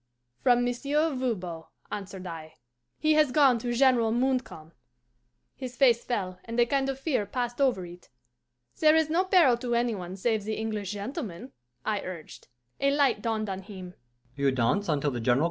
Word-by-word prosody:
'From 245 Hz, -1 st, +4 dB
Monsieur 285 Hz, +6 st, 0 dB
Voban,' 185 Hz, -11 st, -3 dB, 0.3 s
answered 195 Hz, -2 st, -6 dB
I. 160 Hz, -2 st, -8 dB, 0.4 s
'He 310 Hz, 0 st, +2 dB
has 305 Hz, -3 st, +4 dB
gone 265 Hz, -4 st, +4 dB
to 240 Hz, +1 st, -3 dB
General 240 Hz, -2 st, +3 dB
Montcalm.' 245 Hz, -10 st, -1 dB, 0.8 s
His 255 Hz, -2 st, -7 dB
face 240 Hz, -3 st, +4 dB
fell, 185 Hz, -6 st, -3 dB
and 230 Hz, +1 st, -4 dB
a 240 Hz, -, +6 dB
kind 270 Hz, +2 st, 0 dB
of 270 Hz, -, -2 dB
fear 270 Hz, -8 st, -1 dB
passed 245 Hz, +3 st, -3 dB
over 245 Hz, -10 st, +2 dB
it. 175 Hz, +1 st, -13 dB, 0.7 s
'There 310 Hz, 0 st, +6 dB
is 320 Hz, -1 st, +2 dB
no 360 Hz, +4 st, +2 dB
peril 340 Hz, -11 st, +5 dB
to 240 Hz, -1 st, -2 dB
any 235 Hz, 0 st, +1 dB
one 180 Hz, -2 st, -6 dB
save 215 Hz, +2 st, 0 dB
the 215 Hz, +1 st, -3 dB
English 215 Hz, -3 st, -3 dB
gentleman,' 225 Hz, -, -6 dB, 0.3 s
I 210 Hz, -2 st, 0 dB
urged. 175 Hz, -4 st, -9 dB, 0.3 s
A 275 Hz, -, +3 dB
light 280 Hz, -6 st, +2 dB
dawned 220 Hz, -1 st, -1 dB
on 190 Hz, -1 st, -4 dB
him. 185 Hz, -3 st, -10 dB
240 Hz, 155 wpm, -28 LUFS, 200-270 Hz, 0.8 s, a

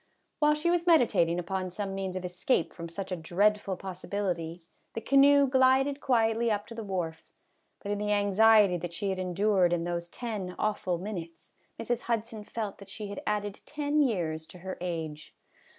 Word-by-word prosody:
While 300 Hz, 0 st, +4 dB
she 330 Hz, +3 st, +1 dB
was 350 Hz, 0 st, 0 dB
meditating 235 Hz, -, +4 dB
upon 185 Hz, +1 st, -2 dB
some 195 Hz, +2 st, -4 dB
means 190 Hz, -1 st, -3 dB
of 185 Hz, -1 st, -4 dB
escape 180 Hz, +1 st, 0 dB
from 170 Hz, -1 st, -7 dB
such 190 Hz, +3 st, -6 dB
a -, -, 0 dB
dreadful 195 Hz, +3 st, +1 dB
possibility 180 Hz, -3 st, -4 dB, 0.3 s
the -, -, -1 dB
canoe 280 Hz, +2 st, +6 dB
glided 265 Hz, +2 st, +3 dB
quietly 230 Hz, -2 st, +2 dB
up 205 Hz, -1 st, -1 dB
to -, -, -7 dB
the 225 Hz, -1 st, -6 dB
wharf, 180 Hz, -5 st, -3 dB, 0.6 s
but 205 Hz, -, -3 dB
in 205 Hz, -, -1 dB
the 210 Hz, 0 st, -1 dB
anxiety 205 Hz, -1 st, +5 dB
that 170 Hz, 0 st, -6 dB
she 195 Hz, +3 st, -2 dB
had 190 Hz, -, -3 dB
endured 185 Hz, 0 st, +2 dB
in 175 Hz, -1 st, 0 dB
those 170 Hz, 0 st, -3 dB
ten 205 Hz, -3 st, -5 dB
awful 205 Hz, -4 st, -1 dB
minutes 170 Hz, -3 st, -7 dB, 0.3 s
Mrs. 240 Hz, +1 st, -1 dB
Hudson 230 Hz, -2 st, -3 dB
felt 210 Hz, -1 st, -5 dB
that 200 Hz, -1 st, -12 dB
she 210 Hz, +1 st, -6 dB
had 200 Hz, -, -6 dB
added 205 Hz, -1 st, -2 dB
ten 300 Hz, 0 st, 0 dB
years 165 Hz, -, -1 dB
to -, -, -13 dB
her 190 Hz, -, -4 dB
age. 160 Hz, -4 st, -5 dB
200 Hz, 180 wpm, -29 LUFS, 180-225 Hz, 0.6 s, canoe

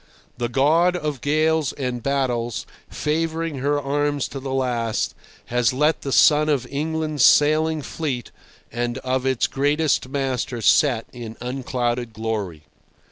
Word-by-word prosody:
The 120 Hz, -1 st, -1 dB
God 160 Hz, +8 st, +3 dB
of 150 Hz, -6 st, -3 dB
gales 155 Hz, 0 st, +1 dB
and 125 Hz, -3 st, -3 dB
battles 120 Hz, -4 st, -1 dB, 0.2 s
favouring 160 Hz, -1 st, -2 dB
her 145 Hz, +2 st, +1 dB
arms 145 Hz, 0 st, -1 dB
to 135 Hz, -, -6 dB
the 135 Hz, 0 st, -5 dB
last, 120 Hz, -4 st, -1 dB, 0.3 s
has 120 Hz, -1 st, +1 dB
let 150 Hz, +4 st, +2 dB
the 135 Hz, -, -4 dB
sun 150 Hz, +2 st, +5 dB
of 140 Hz, -4 st, +1 dB
England's 155 Hz, -1 st, -1 dB
sailing 155 Hz, +1 st, +4 dB
fleet 135 Hz, -7 st, -4 dB, 0.4 s
and 120 Hz, +1 st, -2 dB
of 130 Hz, 0 st, -1 dB
its 130 Hz, -2 st, +2 dB
greatest 145 Hz, 0 st, +1 dB
master 135 Hz, -2 st, -2 dB
set 120 Hz, +1 st, +4 dB
in 115 Hz, -3 st, -8 dB
unclouded 125 Hz, -2 st, -2 dB
glory. 105 Hz, -8 st, -4 dB
135 Hz, 135 wpm, -22 LUFS, 120-150 Hz, 0.4 s, sun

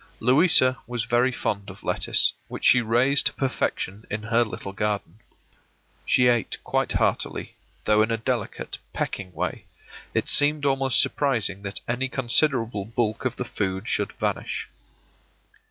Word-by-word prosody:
Louisa 130 Hz, 0 st, +4 dB
was 120 Hz, -1 st, -2 dB
very 120 Hz, +2 st, +2 dB
fond 100 Hz, -4 st, -3 dB
of 100 Hz, -, -12 dB
lettuce, -, -, +1 dB
which -, -, -6 dB
she 125 Hz, -, +6 dB
raised 125 Hz, +6 st, +3 dB
to 150 Hz, -, -3 dB
perfection 110 Hz, -6 st, -2 dB
in 105 Hz, +1 st, -3 dB
her 115 Hz, +2 st, +2 dB
little 100 Hz, -3 st, -6 dB
garden. 105 Hz, -1 st, -3 dB, 0.9 s
She 125 Hz, -, +4 dB
ate 120 Hz, -2 st, +1 dB
quite -, -, 0 dB
heartily, -, -, -1 dB, 0.3 s
though 105 Hz, 0 st, +4 dB
in 110 Hz, -, +2 dB
a 115 Hz, -, 0 dB
delicate, 115 Hz, -, -3 dB
pecking 95 Hz, -3 st, -3 dB
way; 80 Hz, -, -4 dB, 0.5 s
it -, -, 0 dB
seemed 145 Hz, 0 st, +3 dB
almost 135 Hz, -2 st, +2 dB
surprising 115 Hz, -9 st, +1 dB
that 100 Hz, 0 st, -5 dB
any 125 Hz, +2 st, -1 dB
considerable 120 Hz, -4 st, +1 dB
bulk 115 Hz, +1 st, -2 dB
of 125 Hz, -2 st, -1 dB
the 125 Hz, -, -4 dB
food 95 Hz, -1 st, -3 dB
should 105 Hz, -3 st, -1 dB
vanish. -, -, -3 dB
120 Hz, 145 wpm, -25 LUFS, 105-130 Hz, 0.9 s, she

